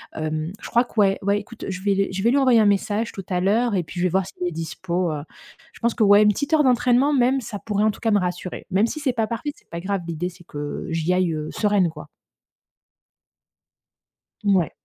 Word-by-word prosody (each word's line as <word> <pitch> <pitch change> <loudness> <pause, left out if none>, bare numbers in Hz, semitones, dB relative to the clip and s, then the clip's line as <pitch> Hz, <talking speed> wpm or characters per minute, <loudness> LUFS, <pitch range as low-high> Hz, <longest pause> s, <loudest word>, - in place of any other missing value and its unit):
Hem, 155 +2 -3
je - - -8
crois 240 +1 +3
que, - - -21
ouais, 195 -1 +3
ouais, 200 +1 +2
écoute, 220 +3 -10
je 190 -1 -5
vais 200 - +1
l 195 0 +2
je 190 +2 -3
vais 235 - +4
lui 280 - +3
envoyer 255 -4 +5
un - - +4
message 210 +2 +1
tout 195 - -8
à 180 -1 0
l'heure 220 +4 +2
et 180 - +1
puis 175 +3 -8
je 180 - +1
vais - - +3
voir 190 +2 +1
s'il 180 -1 -5
est - - -2
dispo, 170 +1 -2
heu. 145 -1 -4 0.5
Je - - -16
pense 235 0 +1
que 225 - +1
ouais, 205 0 +7
1 210 - +5
petite 285 +9 -1
heure 310 -1 +5
d'entraînement, 255 +2 +3
même, 260 0 +3
ça 205 -3 -6
pourrait, 210 -1 -1
en 215 - +3
tout - - -13
cas, 225 -2 0
me 205 - +4
rassurer. 180 0 -4
Même 200 +5 +3
si 305 - -5
c'est 275 -3 +1
pas 225 -2 0
parfait, 235 +6 -3
c'est - - -26
pas 170 0 -6
grave. 195 +1 -1
L'idée, 170 +2 -3
c'est 175 -1 -17
que 145 -1 -6
j'y 165 +1 -1
aille, 180 -2 +1
heu, 155 0 -4
sereine, 205 -4 +2
quoi. 150 -1 -10 2.4
Mouais. 190 -5 +3
200 Hz, 245 wpm, -23 LUFS, 175-230 Hz, 2.4 s, ouais